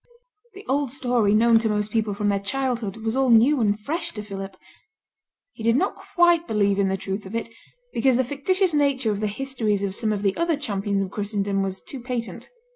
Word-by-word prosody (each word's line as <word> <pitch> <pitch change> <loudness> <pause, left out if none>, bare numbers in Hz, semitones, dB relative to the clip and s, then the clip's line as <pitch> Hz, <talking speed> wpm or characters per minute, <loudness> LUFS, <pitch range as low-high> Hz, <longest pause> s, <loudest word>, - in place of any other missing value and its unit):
The 395 - -11
old 275 -1 0
story 245 -6 +1
known 230 +1 +5
to 225 -1 0
most 210 0 -1
people 215 -2 0
from 205 0 0
their 200 -1 +1
childhood 235 -2 -2
was 225 +1 -3
all 265 -1 +2
new 245 +4 +5
and 205 -1 +1
fresh 325 +10 -3
to 210 - -6
Philip. 195 -2 -7 1.0
He - - -12
did 230 +1 +3
not 370 +9 +1 0.2
quite 345 -1 +4
believe 200 -2 +1
in 195 - +3
the 190 0 0
truth 195 +1 -5
of 205 - -7
it, 230 0 -3 0.4
because 255 +2 +3
the 260 - +3
fictitious 340 +8 0
nature 280 -6 +2
of 205 - -2
the 215 - 0
histories 215 -3 -2
of 195 -1 -1
some 215 +2 +1
of 205 -1 -2
the 195 -1 +1
other 335 -2 0
Champions 200 -7 -1
of 190 - -6
Christendom 200 -1 -1
was 190 -1 -2
too 270 - -8
patent. 240 - -5
225 Hz, 210 wpm, -24 LUFS, 200-270 Hz, 1.0 s, known